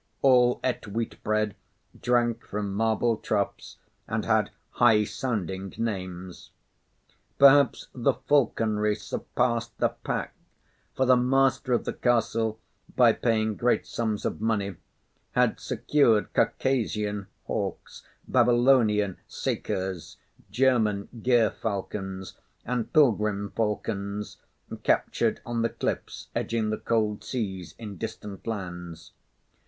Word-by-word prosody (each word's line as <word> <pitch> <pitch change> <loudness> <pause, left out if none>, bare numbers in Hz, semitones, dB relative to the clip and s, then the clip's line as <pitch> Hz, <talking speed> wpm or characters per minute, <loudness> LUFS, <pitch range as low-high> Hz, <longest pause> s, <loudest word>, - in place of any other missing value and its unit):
All 125 -2 +5
ate 125 -3 -1
wheat 115 +3 -4
bread, 110 -1 +1 0.5
drank 120 -1 +1
from 100 -1 -4
marble 110 +2 +1
troughs, 100 -2 -2 0.3
and - - -2
had - - +2 0.2
high 110 -3 +5
sounding 95 - -3
names. 95 -5 -5 0.9
Perhaps 140 0 +6
the 130 +1 +1
falconry 110 -6 +1
surpassed 115 +2 -2
the - - +2
pack; - - -4 0.6
for 130 - +2
the 130 0 +6
master 130 +1 +2
of 120 - +2
the - - -2
castle, 115 -2 +1 0.4
by - - +6
paying 110 -2 +1
great 120 +3 +1
sums 110 -3 -2
of - - -2
money, 100 -4 0 0.6
had 125 -2 +2
secured 120 -2 +2
Caucasian 105 -6 0 0.2
hawks, - - -4 0.3
Babylonian 120 -5 +3
sakers, 95 -2 -3 0.3
German 110 -6 +2
gerfalcons, 100 -5 -1 0.3
and 120 -1 -2
pilgrim 105 -9 +2
falcons 105 -2 -2 0.4
captured - - +1
on 120 -1 -2
the 115 - +1
cliffs - - -4
edging 110 -2 -1
the 110 - -1
cold 105 -3 0
seas, 95 -7 -4
in 105 -4 -8
distant 105 -3 -7
lands. 90 -6 -6
110 Hz, 105 wpm, -27 LUFS, 100-120 Hz, 0.9 s, Perhaps